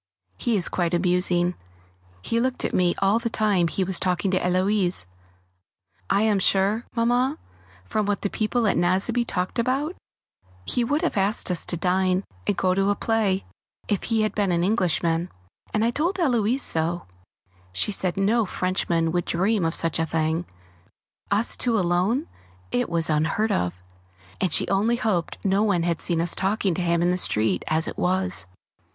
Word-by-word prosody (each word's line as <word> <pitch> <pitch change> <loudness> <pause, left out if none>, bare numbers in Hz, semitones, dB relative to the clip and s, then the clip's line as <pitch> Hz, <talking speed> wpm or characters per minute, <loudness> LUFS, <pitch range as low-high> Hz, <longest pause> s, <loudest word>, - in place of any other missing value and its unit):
He 235 -3 +1
is 180 - 0
quite 175 -1 -1
amusing; 180 0 +1 0.7
he 230 - 0
looked 255 +1 -1
at - - -2
me 180 -1 +2
all 200 +4 +3
the 230 0 -2
time 205 -6 +2
he 190 +4 -1
was 185 -1 0
talking 180 +1 0
to 185 - +2
Héloise. 185 - +1 1.0
I 200 - +3
am 215 -3 +2
sure, 195 +5 +1
Mamma, 245 +5 +1 0.5
from 210 - -1
what 205 -1 -1
the 200 - 0
people 225 +2 0
at 200 - +2
Nazeby 195 +7 +2
talked 185 +4 -2
about, 270 +8 0 0.7
he 245 - 0
would 290 +8 0
have 335 - -1
asked 195 0 +1
us 180 - -1
to 175 - 0
dine 185 +2 +1 0.2
and 200 - +1
go 185 -1 +2
to 195 +1 +1
a 205 - +2
play 210 -4 0 0.4
if 205 -3 -1
he 225 -2 +1
had 215 - -1
been 200 -3 0
an 170 0 +1
Englishman, 175 -4 0 0.4
and 215 +1 +1
I 235 - +2
told 335 +9 -1
Héloise 255 - +1
so. 165 -1 +1 0.7
She 95 - +1
said 185 -2 -1
no 215 +4 +2
Frenchman 175 -3 0
would 175 0 -1
dream 195 +3 +1
of 165 0 0
such 165 -1 0
a 165 - 0
thing 160 +2 -1 0.8
us 205 +3 +1
two 235 -2 +1
alone 185 - +1 0.4
it 125 - 0
was 170 -1 0
unheard 165 +8 +1
of! 90 - 0 0.7
and 185 - +1
she - - +2
only 210 +5 +2
hoped 210 -8 -1
no 195 +1 +2
one 200 -6 +2
had 170 -1 -1
seen 170 -2 +1
us 170 - 0
talking 195 -1 0
to 180 - -3
him 170 -1 +1
in 175 - +3
the 180 - 0
street 105 - +1
as 160 +1 +2
it - - -6
was! 185 - 0
190 Hz, 180 wpm, -24 LUFS, 175-220 Hz, 1.0 s, all